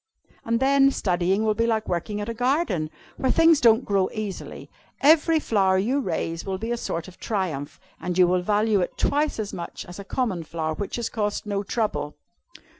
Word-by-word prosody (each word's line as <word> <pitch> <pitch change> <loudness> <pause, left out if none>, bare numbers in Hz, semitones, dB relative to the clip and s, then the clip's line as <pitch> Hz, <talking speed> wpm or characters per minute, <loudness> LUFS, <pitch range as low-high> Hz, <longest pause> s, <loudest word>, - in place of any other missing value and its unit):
And 230 0 0
then, 275 +1 +5
studying 185 -3 0
will 215 - +3
be 230 +2 0
like 220 -2 0
working 185 +4 -2
at 205 - -4
a 230 - -3
garden, 245 - 0 0.3
where 260 - 0
things 330 -2 +5
don't 230 0 +5
grow 195 -2 +1
easily. 210 -3 -6 0.3
Every 315 +2 +5
flower 195 -8 +2
you 240 +9 +1
raise 165 - -2
will 190 -1 -3
be 225 +4 -4
a - - +1
sort 165 -7 -4
of 185 - -14
triumph, 180 - -3 0.2
and 180 0 -3
you 180 - +7
will 180 0 +2
value 210 +2 +2
it 180 - -3
twice 295 +1 +1
as 215 -2 -4
much 170 - -6
as 180 +2 -10
a - - -6
common 200 -4 -2
flower 160 0 -3
which 200 +5 -4
has 235 -1 -2
cost 210 -2 -2
no 200 -1 -1
trouble." 190 -9 -2
210 Hz, 195 wpm, -24 LUFS, 180-235 Hz, 0.3 s, you